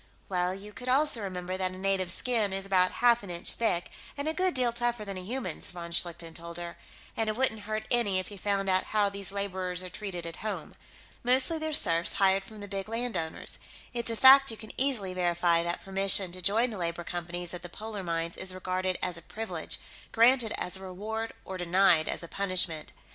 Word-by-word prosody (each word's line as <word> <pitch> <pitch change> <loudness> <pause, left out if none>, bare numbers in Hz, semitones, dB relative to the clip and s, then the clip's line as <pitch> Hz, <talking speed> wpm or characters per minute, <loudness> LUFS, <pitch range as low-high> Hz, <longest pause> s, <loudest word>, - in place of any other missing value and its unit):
"Well, 180 -1 0
you 205 +2 -10
could 255 +2 -6
also 275 -2 +3
remember 185 -1 -4
that 185 -1 -2
a - - -9
native's 190 -2 +1
skin 225 -6 0
is 195 0 -2
about 185 -2 +3
half 240 -1 +6
an 200 - -10
inch 170 -1 -1
thick, 180 -7 0 0.3
and 285 +2 -3
a 315 - +1
good 370 +1 +1
deal 245 -2 +2
tougher 240 -2 -1
than 195 -1 -5
a 185 - -5
human's," 210 -4 -4
von 170 -1 -7
Schlichten 170 -1 +1
told 170 +1 -4
her. 175 0 -6 0.4
"And 225 -1 0
it 215 - -1
wouldn't 220 -4 +2
hurt 215 0 -2
any 230 -6 +4
if 185 +2 -3
you 200 - -9
found 200 -1 0
out 185 0 +2
how 210 -2 +2
these 200 -1 -1
laborers 185 -2 -2
are 180 - -7
treated 180 -3 -5
at 165 - -6
home. 215 -1 -5 0.5
Mostly 260 +6 +4
they're 315 0 -2
serfs 170 - +4
hired 195 0 +3
from 215 -2 -11
the 205 - -7
big 195 +1 -4
landowners; 225 -8 -2 0.3
it's 235 -1 -2
a 230 - -1
fact 270 +3 +8
you 225 - -3
can 220 - -7
easily 245 -9 +2
verify 175 -1 +2
that 170 +1 -3
permission 195 -1 +3
to 185 +1 -9
join 225 +7 +2
the 210 - -6
labor 170 0 -2
companies 175 0 -5
at 180 - -6
the 175 - -8
polar 215 +2 -6
mines 170 -1 -2
is 185 0 -1
regarded 185 0 -1
as 175 - -2
a - - -15
privilege, 220 +6 -4 0.3
granted 235 0 +4
as 180 - -1
a - - -11
reward 215 +4 -4
or 190 -1 -6
denied 175 -2 +4
as - - -2
a - - -7
punishment. 185 -4 -2
195 Hz, 215 wpm, -29 LUFS, 180-225 Hz, 0.5 s, fact